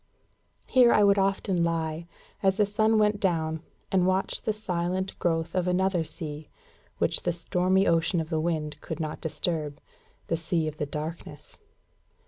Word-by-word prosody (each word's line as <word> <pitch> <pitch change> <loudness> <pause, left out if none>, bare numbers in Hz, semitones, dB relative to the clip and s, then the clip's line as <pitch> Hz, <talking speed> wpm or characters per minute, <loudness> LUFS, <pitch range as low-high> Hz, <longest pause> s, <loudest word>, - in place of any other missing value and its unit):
Here 250 -2 +5
I 210 - +5
would 200 0 +5
often 195 -2 +1
lie, 165 0 -1 0.3
as 190 -1 +2
the 210 - +4
sun 215 +2 +2
went 210 -1 +3
down, 160 -4 0 0.3
and 185 -1 +3
watch 190 +1 0
the - - 0
silent 185 -2 -2
growth 165 -1 0
of 180 -1 0
another 180 -1 +2
sea, 155 -1 -7 0.5
which - - +1
the 175 - 0
stormy 180 +3 +2
ocean 165 +1 +2
of 160 +1 -4
the 160 -1 +1
wind 155 -3 -2
could 160 - -6
not 155 -1 -4
disturb 155 -2 -2 0.5
the 165 - -1
sea 165 0 -1
of 155 0 -5
the 150 - -2
darkness. 155 +3 -7
175 Hz, 160 wpm, -27 LUFS, 160-190 Hz, 0.5 s, Here